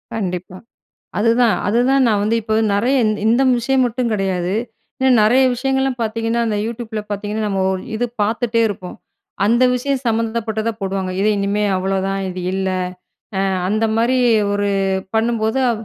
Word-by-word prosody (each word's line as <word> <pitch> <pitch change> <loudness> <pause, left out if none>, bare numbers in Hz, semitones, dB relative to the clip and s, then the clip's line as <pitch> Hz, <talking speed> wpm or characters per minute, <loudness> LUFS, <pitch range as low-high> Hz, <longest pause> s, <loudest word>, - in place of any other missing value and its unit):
கண்டிப்பா. 180 -3 -4 0.6
அதுதான். 230 +1 +3
அதுதான் 250 +5 +3
நான் 210 -3 +2
வந்து 220 +2 +1
இப்ப, 220 0 -2 0.2
நிறைய 240 +7 +2
இந், 215 - +1
இந்த 235 +4 +3 0.2
விஷயம் 260 +2 +1
மட்டும் 240 -1 -1
கிடையாது. 190 -3 -1 0.5
இன்னும் 260 -3 +4
நிறைய 250 +5 +4
விஷயங்கள்லாம் 265 0 -1
பார்த்தீங்கன்னா, 225 +1 -1
அந்த 210 -2 -1
Youtubeல 225 -1 -5
பார்த்தீங்கன்னா, 210 +1 -3
நம்ம 195 -2 -1
ஓ - - +1 0.2
இது 245 +2 0 0.2
பார்த்துட்டே 230 +2 +1
இருப்போம். 185 -3 -7 0.5
அந்த 235 +4 +3
விஷயம் 270 +1 -1
சம்மந்தப்பட்டதா 225 0 -1
போடுவாங்க. 190 -1 -2
இது, 205 - +2
இனிமே 200 +1 0
அவ்வளோதான். 195 +1 -1
இது 180 0 -5
இல்ல. 190 0 -1 0.7
அ - - +1 0.3
அந்த 215 +3 +1
மாரி, 245 +3 +2 0.4
ஒரு 205 0 0 0.5
பண்ணும்போது, 225 +1 +1
அ - - +3
220 Hz, 150 wpm, -19 LUFS, 200-240 Hz, 0.7 s, இன்னும்